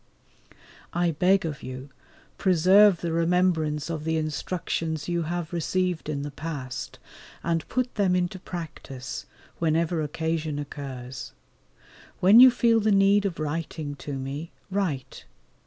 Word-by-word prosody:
I 175 0 +2
beg 180 +4 +3
of 150 -3 -4
you 130 +2 -7 0.5
preserve 190 +1 +5
the 170 - -2
remembrance 165 -3 +1
of 160 -2 -4
the 160 0 0
instructions 160 0 -2
you 175 -1 0
have 170 +1 -3
received 175 -1 -1
in 140 -2 -2
the 145 - -5
past, 140 -5 -6 0.5
and 165 -1 -1
put 255 -1 -1
them 195 -4 +2
into 180 +1 -1
practice, 150 -6 -7 0.3
whenever 165 0 +1
occasion 155 0 -2
offers. 135 -4 -7 0.9
When 200 +6 +7
you 255 +1 +11
feel 235 -2 +3
the 215 0 +2
need 200 +1 +4
of 175 - -5
writing 155 -1 -3
to 145 - -6
me, 135 +4 -5 0.2
write. 180 -10 -2
165 Hz, 130 wpm, -26 LUFS, 150-180 Hz, 0.9 s, you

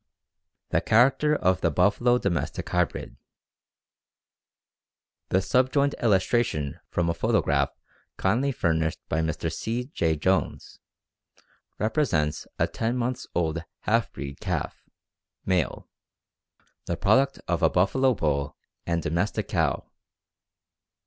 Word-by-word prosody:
The - - +2
character 135 +6 +4
of 95 -9 +1
the 85 - +3
buffalo 105 - +3
domestic 90 - -2
hybrid. 90 -1 -1 2.1
The 95 0 +2
subjoined 130 +7 +2
illustration 95 - +1
from 85 -1 0
a 85 - +1
photograph 85 - +1 0.5
kindly 120 +9 +1
furnished 80 -8 0
by 80 - 0
Mr. 80 -2 -2
C. 125 +4 -3
J. 80 -1 +1
Jones, 95 +5 -1 1.0
represents 105 - 0
a - - +3
ten 115 +2 -2
months' 125 +1 -2
old 85 -1 0 0.2
half 115 0 +1
breed 70 -2 -7
calf - - -4 0.6
(male), 90 -6 0 1.0
the 85 - -2
product 130 +9 +3
of - - 0
a - - +5
buffalo 130 +8 +2
bull 70 -4 -1 0.3
and 85 -1 0
domestic 85 +6 -1
cow. - - 0
95 Hz, 110 wpm, -26 LUFS, 80-120 Hz, 2.1 s, a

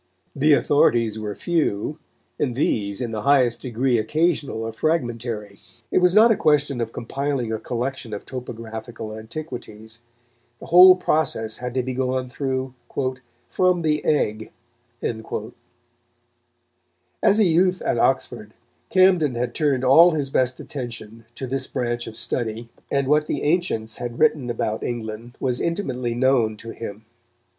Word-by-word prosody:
The 150 +2 +4
authorities 120 -7 +3
were 105 -2 -4
few, 150 - -1 0.4
and 130 -5 0
these 100 -6 0
in 120 -2 -3
the 110 -1 -3
highest 130 -2 +3
degree 125 -1 0
occasional 150 -1 0
or 115 0 -4
fragmentary. 115 -7 -2 0.3
It - - +4
was 180 +1 +3
not 225 +2 +7
a - - +4
question 150 -6 +2
of 115 -1 -3
compiling 130 -1 -3
a 110 - -2
collection 125 +1 -4
of 105 - -6
topographical 115 -2 -7
antiquities. 110 -2 -8 0.6
The - - -10
whole 185 +2 +9
process 150 -11 -1
had 125 0 -5
to 130 - +1
be 130 +1 -3
gone 130 0 -1
through 130 0 -3 0.7
"from 180 -2 +1
the 150 -1 +1
egg." 110 -8 0 2.7
As 205 +2 +4
a - - +6
youth 180 +1 +3
at 120 - 0
Oxford, 120 -5 0 0.3
Camden 180 -8 +4
had 120 +1 -2
turned 140 -5 +1
all 160 +7 +7
his 140 -3 -2
best 130 -1 +1
attention 115 -4 -7
to 130 - -5
this 130 +1 -3
branch 120 -1 -3
of 110 - -8
study, 115 -1 -3 0.2
and 140 -1 0
what 150 +1 +3
the - - -2
ancients 145 - 0
had 120 -1 -5
written 150 -5 +2
about 110 -2 -2
England 115 +1 -5
was 125 -2 -1
intimately 130 -10 -2
known 120 -4 +2
to 115 +2 -8
him. 110 -1 -8
125 Hz, 145 wpm, -23 LUFS, 115-150 Hz, 2.7 s, whole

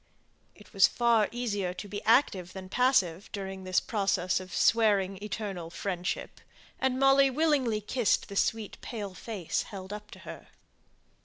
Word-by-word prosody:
It - - -18
was 195 -2 +6
far 235 -3 +2
easier 205 -7 -2
to 205 - -7
be 205 0 -6
active 205 -6 +3
than 190 -1 -8
passive 200 -7 +2
during 190 -1 -6
this 185 -1 +2
process 195 -4 0
of 185 -1 -10
"swearing 200 -3 +3
eternal 200 -5 -5
friendship," 180 0 -4 0.4
and 260 -1 +1
Molly 270 0 +5
willingly 265 -6 +1
kissed 230 +1 +1
the 200 - -8
sweet 220 +1 -1
pale 205 -5 -6
face 195 -4 -3
held 195 0 -7
up 210 0 -8
to - - -12
her. - - -10
205 Hz, 150 wpm, -29 LUFS, 190-235 Hz, 0.4 s, was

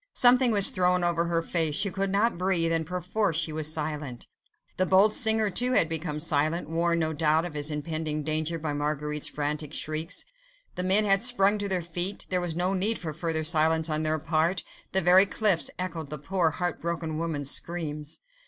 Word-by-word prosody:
Something 250 0 +6
was 200 -3 +5
thrown 180 0 +1
over 170 -1 +1
her 170 -1 -1
face; 165 -3 0
she 200 +2 +1
could 195 +1 -2
not 210 +5 +1
breathe, 180 -3 +1
and 165 -2 -1
perforce 180 0 -2
she 160 -1 -1
was 155 0 0
silent. 150 -5 -5 0.5
The 185 - 0
bold 195 +4 +4
singer, 220 -2 +3
too, 250 +7 +2
had 165 - +5
become 160 -2 -3
silent, 155 +2 -1
warned, 170 +1 0
no 160 0 -2
doubt, 155 +1 +1
of 175 - -7
his 150 0 -1
impending 155 0 -4
danger 155 +2 -2
by 155 -2 -4
Marguerite's 150 0 -2
frantic 150 0 -4
shrieks. 155 +2 -2 0.5
The - - -4
men 190 +4 +4
had 195 -1 +3
sprung 210 -4 +2
to 200 0 -4
their 185 -2 0
feet, 175 +4 -2
there 185 -1 +1
was 175 -2 -4
no 180 +2 -1
need 205 +4 +3
for 160 -3 -6
further 165 -1 -3
silence 160 0 +2
on 155 0 0
their 155 0 0
part; 160 +3 -1 0.3
the 190 - +2
very 185 +3 +6
cliffs 200 -6 +2
echoed 165 -5 -5
the 150 - -4
poor, 170 +3 0
heart 175 +1 -4
broken 165 -2 -4
woman's 145 -4 -2
screams. 155 -3 -5
165 Hz, 195 wpm, -26 LUFS, 155-185 Hz, 0.5 s, Something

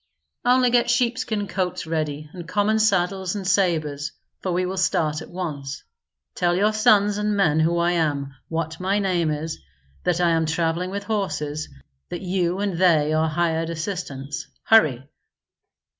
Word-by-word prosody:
"Only 250 0 +4
get 240 -1 +3
sheepskin 235 -4 0
coats 185 -1 -2
ready 155 -2 -2
and 175 -3 -8
common 210 +4 +1
saddles 190 -2 +1
and 200 -2 -4
sabres, 155 -7 +1 0.3
for 185 - -3
we 180 +1 +1
will 185 +1 -3
start 155 -4 +1
at - - -10
once. 145 -7 -5 0.5
Tell 175 -1 +1
your 210 +4 +2
sons 210 -2 +4
and 210 0 0
men 160 -6 +3
who 165 +2 +2
I 170 +1 +2
am, 145 -5 0 0.2
what 160 0 -3
my 190 +2 +1
name 180 -5 +1
is, 155 +1 -3 0.4
that 180 -1 +1
I 175 -1 +3
am 165 -1 +1
travelling 165 +2 0
with 200 +1 -4
horses, 170 -8 -2 0.4
that 175 - -5
you 180 -1 0
and 195 -4 -2
they 155 -5 +4
are 160 0 +2
hired 165 0 0
assistants. 155 -5 -5 0.2
Hurry!" 140 - +4
175 Hz, 160 wpm, -23 LUFS, 160-200 Hz, 0.5 s, Only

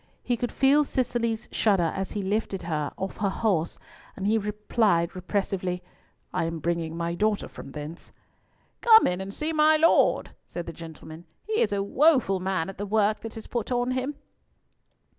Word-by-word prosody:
He 245 - +1
could 240 +1 -3
feel 280 +2 +4
Cicely's 235 -4 -1
shudder 190 -7 +2
as 195 0 -3
he 205 - -2
lifted 200 -1 -1
her 155 -3 -2
off 190 0 -4
her 200 -2 +1
horse, 190 -5 0 0.4
and 195 - -5
he 215 +2 +3
replied 210 -4 +1
repressively, 185 -1 -2 0.5
"I - - 0
am 165 0 -3
bringing 165 0 -2
my 170 0 -1
daughter 210 +3 0
from 135 - -11
thence." 150 +2 -8 0.7
"Come 445 -1 +8
in 180 +1 0
and 190 +1 -5
see 305 +9 -3
my 310 0 +5
Lord," 325 +2 +3
said 175 -1 -6
the 170 - -7
gentleman. 160 0 -10 0.2
"He 440 +2 0
is - - +2
a 200 -1 0
woeful 255 - +3
man 185 -3 -1
at 195 0 -9
the 205 - -3
work 215 +1 +2
that 225 0 -8
is 220 - -8
put 235 0 -3
on 245 0 +1
him." 260 +3 -2
200 Hz, 180 wpm, -26 LUFS, 175-240 Hz, 0.7 s, Come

